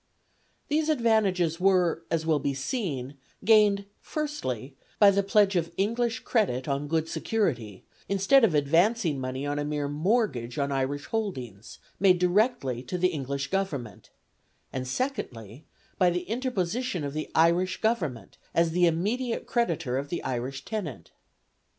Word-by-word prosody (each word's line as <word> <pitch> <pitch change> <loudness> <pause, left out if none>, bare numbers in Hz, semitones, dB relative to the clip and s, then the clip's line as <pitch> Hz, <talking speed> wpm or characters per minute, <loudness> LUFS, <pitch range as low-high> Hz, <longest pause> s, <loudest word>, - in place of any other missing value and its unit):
These 310 +1 +1
advantages 205 - +2
were, 180 -3 +3
as 160 -1 0
will 155 -2 +2
be 140 0 -1
seen, 140 - -3 0.3
gained, 210 -2 +5
firstly, 140 - -4 0.2
by 205 -1 +7
the 200 0 +2
pledge 200 0 +3
of 165 -1 0
English 230 +4 0
credit 190 - 0
on 140 +1 -1
good 160 +1 0
security, 125 - -2 0.3
instead 200 +7 +4
of 185 -9 +4
advancing 165 - +2
money 130 +1 -4
on 145 0 -1
a - - -1
mere 145 -1 -2
mortgage 150 - 0
on 140 -1 0
Irish 140 +1 -1
holdings, 130 - -4 0.2
made 190 -2 +5
directly 180 - +1
to 130 +8 -4
the 180 +1 +3
English 140 -3 -4
Government; 145 - -3 0.6
and, 130 -1 -3
secondly, 130 - -4 0.3
by 180 - +5
the 175 0 -1
interposition 225 - -2
of 140 -1 -4
the 155 0 -4
Irish 175 +3 +3
Government, 160 - -2 0.2
as 165 0 +3
the 175 +1 +4
immediate 220 +9 -1
creditor 165 - 0
of 140 +1 -6
the 175 - -3
Irish 130 +2 -4
tenant. 180 - -5
170 Hz, 145 wpm, -27 LUFS, 140-210 Hz, 0.6 s, by